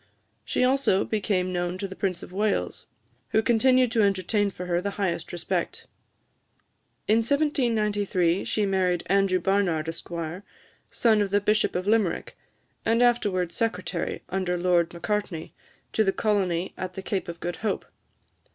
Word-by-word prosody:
She - - 0
also 255 -7 +3
became 190 -4 -1
known 175 0 -1
to 195 +1 -3
the 190 - -9
Prince 185 -3 -2
of - - -11
Wales, 205 +1 -1 0.4
who 220 - +2
continued 255 +1 +4
to 230 -2 +2
entertain 200 +1 +2
for 180 -1 -7
her 175 0 0
the 200 +1 -4
highest 175 -5 -2
respect. 175 - -3 1.2
In 215 - +4
1793, 215 - +1
she 210 - 0
married 185 -3 +1
Andrew 195 -1 +2
Barnard, 180 -4 +1
Esq., 165 0 -7 0.8
son 220 -3 +3
of 200 - 0
the 200 +1 +3
Bishop 210 +1 +1
of 180 +1 -1
Limerick, 210 -4 +1 0.5
and 230 +2 +3
afterwards 200 -8 +1
secretary, 185 -5 -2
under 180 -1 -1
Lord 175 -1 +2
Macartney, 175 -1 -3 0.4
to 220 - +3
the 195 - +2
colony 190 -5 0
at 185 -1 -5
the 190 - -6
Cape 195 -1 -2
of 170 0 -7
Good 175 0 -4
Hope. 215 -3 -2
195 Hz, 150 wpm, -26 LUFS, 180-215 Hz, 1.2 s, continued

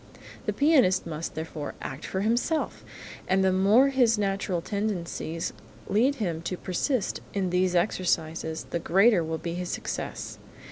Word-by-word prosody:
The - - +3
pianist 275 - +4
must, 160 -1 -5
therefore, 160 -2 -5
act 135 +3 -6
for 190 - -2
himself, 240 +9 0 0.4
and 190 0 +3
the 190 - +4
more 205 +9 +5
his 245 -4 +3
natural 195 -3 0
tendencies 175 -4 -3 0.3
lead 245 +8 +3
him 175 - -2
to 180 +2 -3
persist 200 - -1 0.2
in 190 -3 0
these 180 0 +2
exercises 165 -3 0
the 170 - 0
greater 195 +2 +4
will 160 0 -2
be 170 +1 -4
his 180 0 -4
success. - - -4
185 Hz, 145 wpm, -27 LUFS, 170-215 Hz, 0.4 s, more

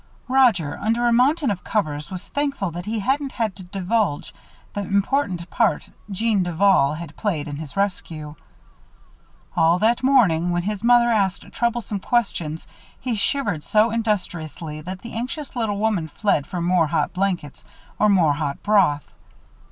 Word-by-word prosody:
Roger, 240 - +3
under 230 +3 0
a 240 - +4
mountain 270 +2 +3
of 185 - -4
covers, 150 -8 -2
was 185 +1 -7
thankful 280 -10 -1
that 175 +4 -7
he 225 +1 -1
hadn't 270 +5 -1
had 220 -5 -2
to 190 - -10
divulge 190 -2 -1 0.4
the 205 - -2
important 200 -2 0
part 230 -3 +1 0.2
Jeanne 210 +1 +1
Duval 175 -4 +3
had 160 -1 -8
played 165 -8 -2
in 145 -1 -5
his 155 +2 -8
rescue. 165 -6 -2 1.2
All 165 0 +4
that 225 +5 +2
morning, 205 -11 +3
when 175 0 0
his 210 +2 -3
mother 240 0 +5
asked 195 -4 +1
troublesome 235 -4 -1
questions, 175 -9 -1 0.3
he 250 - -2
shivered 205 - 0
so 215 +1 +3
industriously 175 -8 -3
that 185 +4 -7
the 235 - -8
anxious 260 +6 -4
little 220 -4 -1
woman 205 -6 0
fled 160 -3 0
for 175 -2 -3
more 175 -2 +3
hot - - 0
blankets 180 -6 -2 0.4
or 210 - +4
more 175 -7 +4
hot 145 -1 -3
broth. 185 -9 +3
200 Hz, 155 wpm, -22 LUFS, 170-230 Hz, 1.2 s, mother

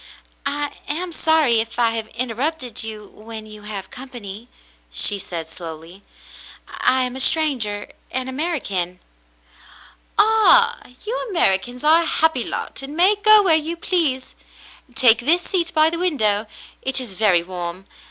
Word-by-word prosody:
"I 290 +1 -2 0.2
am 345 +4 -3
sorry 315 -7 +2
if 225 +1 -4
I 235 -2 +2
have 225 -1 -4
interrupted 250 +1 -3
you 215 -1 -7
when 220 0 -10
you 215 -1 -13
have 205 -2 -8
company," 235 -4 -10 0.4
she 200 - +3
said 170 -4 -7
slowly. 165 +2 -10 0.7
"I 260 0 +1
am 250 0 -3
a - - -6
stranger 255 -10 +1
— - - -36
an 260 0 -3
American." 260 - -3 1.2
"Ah, 445 +2 +5 0.3
you 455 +4 -3
Americans 245 - +1
are 320 +2 +5
a - - -2
happy 320 -8 +3
lot - - -5
and 280 +3 -8
may 370 +4 +5
go 425 0 +6
where 360 -4 +3
you 320 +2 -2
please. 315 -7 -1 0.6
Take 230 -2 +5
this 330 +8 +2
seat 340 -3 -1
by 310 0 +3
the 335 - -4
window; 220 - +1 0.3
it 265 0 -1
is 245 -6 -5
very 185 -4 +2
warm. 180 +1 -7
255 Hz, 150 wpm, -20 LUFS, 210-320 Hz, 1.2 s, go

